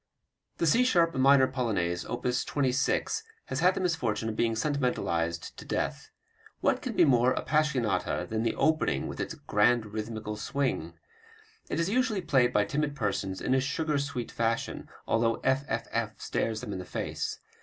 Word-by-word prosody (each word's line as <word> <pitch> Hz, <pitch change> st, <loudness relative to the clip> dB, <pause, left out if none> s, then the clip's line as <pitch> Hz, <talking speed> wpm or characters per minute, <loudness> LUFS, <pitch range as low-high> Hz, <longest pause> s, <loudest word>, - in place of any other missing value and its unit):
The -, -, +1 dB
C 230 Hz, +11 st, +5 dB
sharp 170 Hz, -9 st, +3 dB
minor 135 Hz, 0 st, +5 dB
Polonaise, 100 Hz, -10 st, -1 dB
op. 120 Hz, -, -5 dB
26, 130 Hz, +1 st, 0 dB, 0.2 s
has 130 Hz, -, -3 dB
had 180 Hz, +3 st, +4 dB
the -, -, -2 dB
misfortune 120 Hz, -, 0 dB
of 110 Hz, -, -4 dB
being 115 Hz, 0 st, +1 dB
sentimentalized 110 Hz, -, -1 dB
to -, -, -8 dB
death. -, -, -3 dB, 0.5 s
What -, -, +1 dB
can -, -, -4 dB
be -, -, +6 dB
more 125 Hz, -2 st, +4 dB
"appassionata" 150 Hz, -8 st, 0 dB
than 110 Hz, 0 st, -1 dB
the 115 Hz, 0 st, 0 dB
opening 155 Hz, 0 st, +1 dB
with -, -, -7 dB
its -, -, -3 dB
"grand 105 Hz, 0 st, +1 dB
rhythmical 110 Hz, -1 st, -4 dB
swing"? 105 Hz, -, -2 dB, 0.7 s
It 155 Hz, -, -1 dB
is 165 Hz, -, +1 dB
usually 225 Hz, -2 st, +1 dB
played 130 Hz, -6 st, +3 dB
by 105 Hz, -4 st, +3 dB
timid 145 Hz, +6 st, -1 dB
persons 100 Hz, -5 st, -2 dB
in 130 Hz, -, +1 dB
a 130 Hz, -, +3 dB
sugar 145 Hz, +2 st, 0 dB
sweet 140 Hz, -4 st, -4 dB
fashion, 115 Hz, 0 st, -2 dB, 0.2 s
although 115 Hz, 0 st, +1 dB
fff 115 Hz, -5 st, -1 dB
stares 110 Hz, -1 st, -2 dB
them 105 Hz, -, -5 dB
in -, -, -4 dB
the -, -, -5 dB
face. -, -, -3 dB
125 Hz, 165 wpm, -29 LUFS, 110-145 Hz, 0.7 s, be